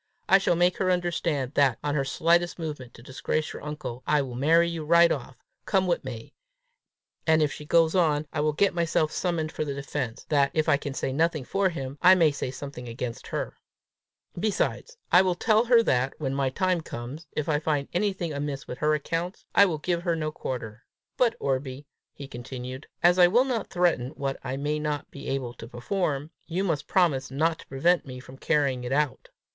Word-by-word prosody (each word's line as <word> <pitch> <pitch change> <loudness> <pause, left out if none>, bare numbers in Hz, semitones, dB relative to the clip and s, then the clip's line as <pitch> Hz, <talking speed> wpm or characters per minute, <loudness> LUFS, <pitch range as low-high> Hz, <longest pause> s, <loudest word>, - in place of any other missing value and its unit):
I 195 - +6
shall 180 - +2
make 175 +1 +2
her 185 - +1
understand 170 -6 0
that, 135 -5 +3
on 145 - -1
her 140 -2 +1
slightest 170 +5 +2
movement 150 -7 -6
to 120 - -14
disgrace 130 +4 -2
your - - -8
uncle, 150 -5 -6
I 150 -2 +3
will 130 -2 -7
marry 160 +7 +4
you 165 -2 -4
right 170 +2 +5
off, 135 -1 -4 0.3
come 190 -2 +2
what 175 -2 0
may; 120 -4 -8 0.9
and 160 0 +5
if 150 - +1
she 150 - -8
goes 165 +1 +3
on, 155 -5 +2
I 155 - -2
shall 150 0 +1
get 200 +6 +2
myself 165 -2 +1
summoned 165 -3 -1
for - - -3
the 140 -2 -4
defence, 140 -4 -4
that, 140 -2 +3
if 155 -1 +1
I 155 - +5
can 140 -1 -6
say 130 - -2
nothing 160 0 +1
for 195 +4 +1
him, 140 -4 -6
I 185 +1 +8
may 165 -4 +4
say 140 - -4
something 130 -2 -8
against 115 0 -5
her. - - -3 0.8
Besides, 215 - -1
I 180 - +8
will 185 -2 +1
tell 220 +5 +3
her 235 -1 +5
that, 130 - +1
when 135 -3 -2
my 135 -1 +1
time 185 +4 0
comes, 140 +3 -8
if 150 - -2
I 150 -2 +2
find 150 -2 -1
anything 180 -3 -1
amiss 140 -1 -4
with 125 - -7
her 155 0 +2
accounts, 165 +5 -4
I 200 - +7
will 165 -4 -2
give 170 +3 -1
her 170 -2 0
no 155 -1 -2
quarter. 120 -5 -6 0.3
But, 235 -2 +2
Orbie," 135 +1 -2 0.3
he 140 - -8
continued, 130 +1 -7 0.2
"as 175 +1 +5
I 175 - +8
will 240 +8 +4
not 240 -6 -2
threaten 175 -9 +1
what 135 -1 -3
I 130 - -3
may 150 +2 -1
not 150 -1 -3
be 140 - -9
able 130 -3 -2
to 115 0 -10
perform, 145 - -2 0.2
you 175 +3 -1
must 160 -6 -1
promise 150 -8 +2
not 160 +4 0
to - - -14
prevent 165 +5 +1
me 130 -1 -7
from 130 +1 -13
carrying 140 -5 +1
it 125 - -4
out." 145 0 0
150 Hz, 205 wpm, -26 LUFS, 135-175 Hz, 0.9 s, I